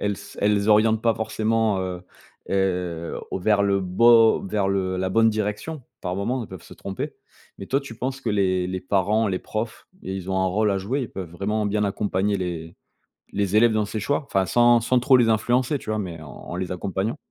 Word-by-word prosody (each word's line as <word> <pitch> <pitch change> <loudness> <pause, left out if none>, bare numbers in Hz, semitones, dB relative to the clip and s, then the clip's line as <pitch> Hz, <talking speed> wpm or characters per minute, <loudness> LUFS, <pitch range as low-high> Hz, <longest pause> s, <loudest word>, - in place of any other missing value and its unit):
elles 100 -1 -1 0.2
elles 105 0 +2
orientent 110 +1 +4
pas 115 -1 +3
forcément, 110 -1 0
heu 90 -1 -4 0.5
heu, 90 -4 -1
au - - -1
vers 100 +2 +3
le 100 -1 +2
beau 115 +5 +5
vers 100 0 0
le 95 -1 0
la 95 0 -1
bonne 115 +4 +4
direction 105 +8 -3 0.2
par 90 -1 -3
moment, 120 +5 -1
elles - - -9
peuvent 95 -3 -10
se - - -13
tromper. 95 -2 -5 0.4
Mais 95 - -7
toi, 135 +2 +1
tu 130 -5 -10
penses 130 +3 -3
que 120 - -3
les 95 -3 +1
les 95 0 -3
parents, 105 +4 +1
les 95 -1 -1
profs, 110 +3 -5 0.2
ils 95 0 -5
ont 95 - 0
un 95 - +2
rôle 105 +3 +1
à 100 - +1
jouer, 115 +9 -2
ils 120 - -6
peuvent 90 -4 -7
vraiment 105 +5 -2
bien 105 +1 0
accompagner 100 0 0
les 85 -2 -5 0.6
les 100 0 0
élèves 115 +1 +6
dans 110 -1 +1
ces 110 +1 -4
choix? 145 +6 0
Enfin, 95 -7 +1
sans 120 +2 +4
sans 125 +2 +2
trop 130 +2 +5
les 115 -2 +3
influencer, 120 +5 +2
tu - - -9
vois? 110 0 0
Mais 85 -5 -5
en 80 - -10
en 85 - -8
les 90 0 -3
accompagnant? 95 - -2
100 Hz, 215 wpm, -24 LUFS, 95-115 Hz, 0.6 s, élèves